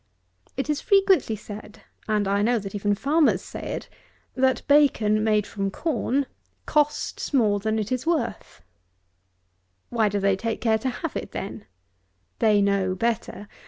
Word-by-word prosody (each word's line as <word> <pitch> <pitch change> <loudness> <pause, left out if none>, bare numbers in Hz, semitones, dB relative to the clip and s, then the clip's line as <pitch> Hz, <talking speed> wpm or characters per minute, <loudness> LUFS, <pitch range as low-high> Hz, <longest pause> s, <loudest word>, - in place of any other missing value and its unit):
It 270 - -1
is 300 -1 -1
frequently 390 - +3
said, 210 +1 -10 0.2
and 210 -2 +1
I 200 +1 +1
know 235 +3 +2
that 195 -3 -6
even 205 0 0
farmers 295 +8 +2
say - - -8
it, - - -5 0.5
that 260 0 +1
bacon, 230 -8 +4
made 215 -2 +2
from 195 -1 -3
corn, 275 - -1 0.4
costs 295 -1 0
more 210 -5 +3
than 220 +2 -1
it 215 +1 -3
is 255 +4 -2
worth! 265 - -2 1.3
Why 225 -3 +2
do 205 0 -1
they 195 0 +2
take 225 +3 -3
care 220 -1 +2
to 260 - -1
have 290 +5 -5
it - - -5
then? 200 +2 -6 0.7
They 210 -2 +4
know 195 -2 +1
better. 210 -1 -2
220 Hz, 155 wpm, -25 LUFS, 205-265 Hz, 1.3 s, bacon